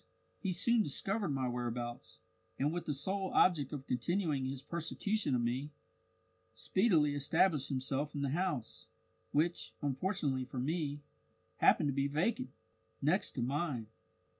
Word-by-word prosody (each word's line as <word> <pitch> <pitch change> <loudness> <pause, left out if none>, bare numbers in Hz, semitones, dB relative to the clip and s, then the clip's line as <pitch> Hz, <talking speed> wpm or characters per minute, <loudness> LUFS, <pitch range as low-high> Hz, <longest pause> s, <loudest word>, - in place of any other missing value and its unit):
he 190 - -1
soon 235 +6 +3
discovered 195 +4 0
my 135 -2 0
whereabouts, 120 0 -4 0.4
and 145 +3 +1
with 175 - -3
the - - +1
sole 190 +6 -1
object 155 -7 +4
of 140 -2 -5
continuing 145 +2 0
his 135 0 -4
persecution 170 0 -1
of 120 - +1
me, 125 +5 -1 0.9
speedily 170 -8 +3
established 145 +1 +2
himself 135 +2 -1
in 140 - -1
the 140 - +1
house 155 -7 -2 0.4
which, 165 +4 0
unfortunately 145 -1 0
for 130 - -8
me, 145 +2 -1 0.6
happened 150 - +5
to 140 - +1
be 140 +1 +1
vacant 190 - 0 0.5
next 155 +8 +2
to 125 - 0
mine. 135 -2 -1
145 Hz, 140 wpm, -34 LUFS, 130-175 Hz, 0.9 s, happened